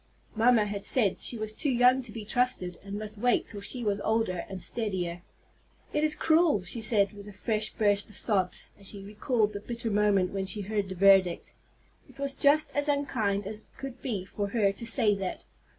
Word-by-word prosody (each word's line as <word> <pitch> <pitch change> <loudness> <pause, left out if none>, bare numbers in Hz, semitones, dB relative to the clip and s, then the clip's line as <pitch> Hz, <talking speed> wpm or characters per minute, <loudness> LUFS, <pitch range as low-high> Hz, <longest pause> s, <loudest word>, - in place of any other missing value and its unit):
Mamma 225 -1 +4
had 205 -1 -5
said 215 -8 +2
she 240 - -2
was 215 0 -3
too 285 - 0
young 250 +1 +4
to 240 -3 -11
be 215 -1 -7
trusted, 245 -7 -1
and 200 0 -6
must 215 0 -7
wait 245 +2 +2
till 205 -2 -8
she 245 +4 -2
was 205 -2 0
older 220 -6 -1
and 190 -1 -6
steadier. 180 -5 -2 0.7
"It 300 - +1
is 305 0 +4
cruel!" 315 - +3
she 210 +6 -2
said 215 -2 +3
with 205 0 -11
a - - -8
fresh 215 +2 -2
burst 205 -1 +2
of 210 - -8
sobs, 190 -5 0
as 195 - -9
she 200 -1 -6
recalled 210 +1 -1
the 200 - -4
bitter 235 +1 -4
moment 200 -3 +2
when 195 -1 -3
she 205 +3 -1
heard 205 -1 -2
the 190 - -5
verdict. 190 -2 +4 0.6
"It - - -18
was 280 0 -2
just 290 +2 +3
as 290 0 +1
unkind 220 -9 0
as 215 +2 -6
could 270 -2 -8
be 210 -8 -3
for 205 +1 -4
her 200 -1 +1
to 195 +4 -6
say 230 -3 +3
that. 190 -1 -5
210 Hz, 205 wpm, -28 LUFS, 200-240 Hz, 0.7 s, Mamma